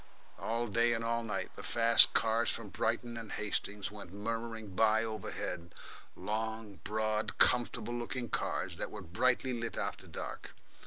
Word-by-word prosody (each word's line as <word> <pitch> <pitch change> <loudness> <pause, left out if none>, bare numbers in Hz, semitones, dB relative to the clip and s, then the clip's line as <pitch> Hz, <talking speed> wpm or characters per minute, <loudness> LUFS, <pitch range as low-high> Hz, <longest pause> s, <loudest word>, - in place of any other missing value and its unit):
All 115 +1 -1
day 115 +2 +3
and 115 -1 -2
all 115 0 +1
night 105 -3 -3
the - - -7
fast 115 0 +7
cars 115 +1 +3
from - - -3
Brighton 120 -1 -1
and 115 -2 -7
Hastings 105 -1 -2
went 100 -4 -9
murmuring 115 +1 -4
by 110 +2 +4
overhead 90 -5 -4 0.4
long, 110 -1 -3
broad, 110 0 -1
comfortable 120 -1 +3
looking 120 +1 -3
cars, - - -2
that - - -2
were 105 -3 -8
brightly 125 +9 +1
lit 115 -1 -3
after - - -3
dusk. - - -6
110 Hz, 150 wpm, -33 LUFS, 105-115 Hz, 0.4 s, fast